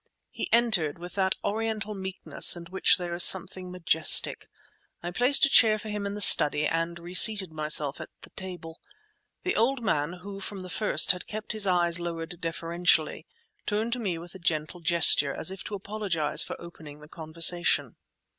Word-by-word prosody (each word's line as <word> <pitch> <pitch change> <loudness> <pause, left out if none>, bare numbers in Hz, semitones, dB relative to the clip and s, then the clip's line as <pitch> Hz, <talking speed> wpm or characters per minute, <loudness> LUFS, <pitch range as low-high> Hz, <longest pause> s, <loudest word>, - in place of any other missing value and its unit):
He - - -7
entered, 215 -11 +1
with 175 +1 -10
that 190 -1 -1
Oriental 215 0 -4
meekness 190 -2 +1
in 170 -1 -10
which 190 - +2
there 175 -2 -6
is 175 - +4
something 185 0 +3
majestic. 165 -3 +2 0.5
I 175 - -6
placed 250 +10 +4
a - - +2
chair 220 -5 +5
for 215 +1 -10
him 210 -1 -5
in 200 - -6
the 210 - -5
study, 150 -5 +5
and 165 +2 -3
reseated 185 +2 +2
myself 150 -2 -1
at - - -10
the - - -15
table. 175 -4 -10 0.6
The 370 - -2
old 245 +2 -1
man, 150 -5 -2
who 200 0 -9
from 195 0 -8
the 185 0 -10
first 210 -7 +3
had 180 -1 -8
kept 215 0 -7
his 215 -2 +2
eyes 175 -2 0
lowered 170 0 -7
deferentially, 165 -1 -2 0.4
turned 220 +3 -3
to 250 - -4
me 190 -7 -4
with 175 +1 -12
a 190 - -12
gentle 160 0 -3
gesture, 160 -4 +2
as - - -3
if 190 - -10
to 210 - -6
apologize 195 -6 -2
for - - -9
opening 155 -4 -13
the 150 - -15
conversation. 165 +2 0
180 Hz, 180 wpm, -25 LUFS, 165-205 Hz, 0.6 s, chair